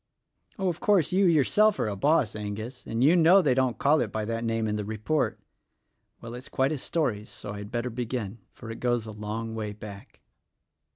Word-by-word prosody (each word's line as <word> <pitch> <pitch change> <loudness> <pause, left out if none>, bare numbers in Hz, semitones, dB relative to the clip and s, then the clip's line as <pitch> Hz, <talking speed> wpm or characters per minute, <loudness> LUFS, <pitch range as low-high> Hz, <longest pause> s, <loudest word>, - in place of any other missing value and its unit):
Oh, 195 -2 -1
of 170 -2 -1
course, 195 -8 +3
you 190 0 +4
yourself 195 +7 +4
are - - 0
a 105 - -2
boss, 140 0 +2
Angus, 110 +4 -6
and 115 +2 0
you 155 +6 +6
know 175 +3 +7
they 145 -9 +3
don't 130 -2 +1
call 150 +2 +3
it 110 - -2
by 110 -1 -2
that 115 +1 -3
name 115 -1 0
in 105 - -1
the 105 - -2
report. 110 +9 -1 0.8
Well, 115 0 -8
it's 125 +2 -9
quite 135 +2 +1
a 150 - -2
story, 125 -10 -1
so 105 - -8
I'd 105 0 -7
better 120 +1 -2
begin 115 -2 -4
— - - -44
for 115 -2 -8
it 115 - -7
goes 120 -2 0
a 110 - -7
long 110 +2 -5
way 105 -2 -4
back. 100 -1 -11
120 Hz, 215 wpm, -27 LUFS, 110-145 Hz, 0.8 s, know